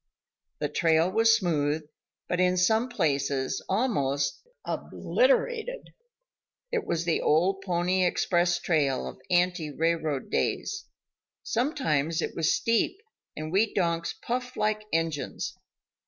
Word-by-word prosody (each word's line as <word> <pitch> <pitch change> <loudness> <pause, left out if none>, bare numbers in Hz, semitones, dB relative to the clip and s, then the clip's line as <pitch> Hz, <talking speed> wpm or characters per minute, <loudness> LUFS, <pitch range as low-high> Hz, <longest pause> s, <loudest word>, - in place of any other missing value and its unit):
The 150 - -1
trail 165 +3 +2
was 225 +2 +5
smooth, 155 -5 0 0.4
but 180 - -1
in 180 0 +3
some 220 +7 +3
places 140 - 0
almost 140 - 0 0.3
obliterated; - - 0 0.8
it 470 -2 -1
was 170 0 -1
the 170 - +1
old 185 +6 +2
pony 180 0 +1
express 175 -1 +2
trail 150 -6 0
of - - -9
ante 175 -3 +2
railroad 160 -2 -1
days. 400 -1 -1 0.6
Sometimes 165 - 0
it - - -2
was 165 0 +2
steep 230 - +1 0.4
and 155 0 -5
we 205 +4 +2
donks 170 -3 0
puffed 250 +1 -3
like 215 0 0
engines. 165 -3 -2
175 Hz, 115 wpm, -27 LUFS, 155-220 Hz, 0.8 s, was